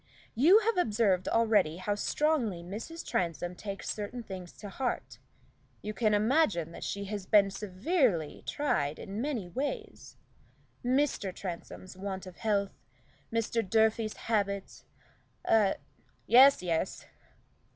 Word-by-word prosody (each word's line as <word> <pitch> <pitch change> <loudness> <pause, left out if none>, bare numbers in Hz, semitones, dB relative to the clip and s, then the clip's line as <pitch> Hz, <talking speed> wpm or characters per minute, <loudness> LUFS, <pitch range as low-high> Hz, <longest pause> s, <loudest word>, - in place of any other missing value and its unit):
You 340 - +6
have 455 -1 0
observed 210 - +2
already 210 -8 +3
how 195 +3 -1
strongly 230 - 0
Mrs. 225 - -7
Transome 175 0 -1
takes 195 +2 -7
certain 220 +3 -5
things 185 -4 -8
to 210 - -10
heart. 245 +5 -3 0.6
You 210 - -4
can 215 -2 +2
imagine 210 - +2
that - - -9
she 200 0 -3
has 200 -2 -5
been 200 -2 +5
severely 195 - 0
tried 155 - 0
in 200 +3 -5
many 250 -9 -2
ways. 290 - -5 0.7
Mr. 255 -6 +1
Transome's 185 0 -7
want 190 0 -5
of 185 -1 -11
health; 200 -3 -1 0.5
Mr. 230 0 0
Durfey's 220 +1 +1
habits 200 -3 -2 0.6
a 210 -3 +4 0.2
" - - -37
"Yes, 260 -2 +7
yes." 170 +1 -2
210 Hz, 125 wpm, -30 LUFS, 185-240 Hz, 0.7 s, Yes